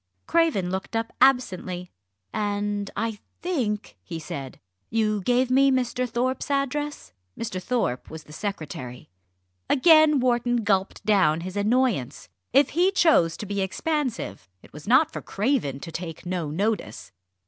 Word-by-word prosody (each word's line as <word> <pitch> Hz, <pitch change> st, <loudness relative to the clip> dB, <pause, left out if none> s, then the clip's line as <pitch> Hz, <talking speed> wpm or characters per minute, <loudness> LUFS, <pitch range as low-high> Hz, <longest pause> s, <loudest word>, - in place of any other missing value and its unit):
Craven 315 Hz, -, +2 dB
looked 190 Hz, +4 st, -4 dB
up 225 Hz, 0 st, -2 dB
absently. 185 Hz, -9 st, +2 dB, 0.4 s
"And 205 Hz, -1 st, -1 dB
I 220 Hz, 0 st, -2 dB, 0.2 s
think," 240 Hz, -, -2 dB
he 170 Hz, -, -7 dB
said, 140 Hz, -4 st, -7 dB, 0.3 s
"you 215 Hz, -2 st, +1 dB
gave 250 Hz, +5 st, +2 dB
me 275 Hz, +1 st, +5 dB
Mr. 250 Hz, -1 st, 0 dB
Thorpe's 255 Hz, +4 st, -1 dB
address?" 280 Hz, -, -2 dB, 0.2 s
Mr. 185 Hz, -5 st, -4 dB
Thorpe 180 Hz, -, -1 dB
was 160 Hz, -1 st, -8 dB
the 150 Hz, -, -14 dB
secretary. 140 Hz, -, -6 dB, 0.6 s
Again 310 Hz, 0 st, +6 dB
Wharton 240 Hz, -1 st, +1 dB
gulped 195 Hz, -2 st, 0 dB
down 175 Hz, -7 st, +3 dB
his 185 Hz, +2 st, -6 dB
annoyance. 205 Hz, -, 0 dB, 0.2 s
If 275 Hz, +2 st, +5 dB
he 355 Hz, +4 st, +3 dB
chose 300 Hz, -, +4 dB
to -, -, -6 dB
be 200 Hz, 0 st, -2 dB
expansive, 250 Hz, -, -2 dB
it -, -, -18 dB
was 150 Hz, +4 st, -11 dB
not 290 Hz, +7 st, +4 dB
for -, -, -5 dB
Craven 200 Hz, -, -1 dB
to 165 Hz, -, -7 dB
take 165 Hz, 0 st, -6 dB
no 175 Hz, -4 st, -2 dB
notice. 185 Hz, -, -2 dB
210 Hz, 140 wpm, -25 LUFS, 180-260 Hz, 0.6 s, Again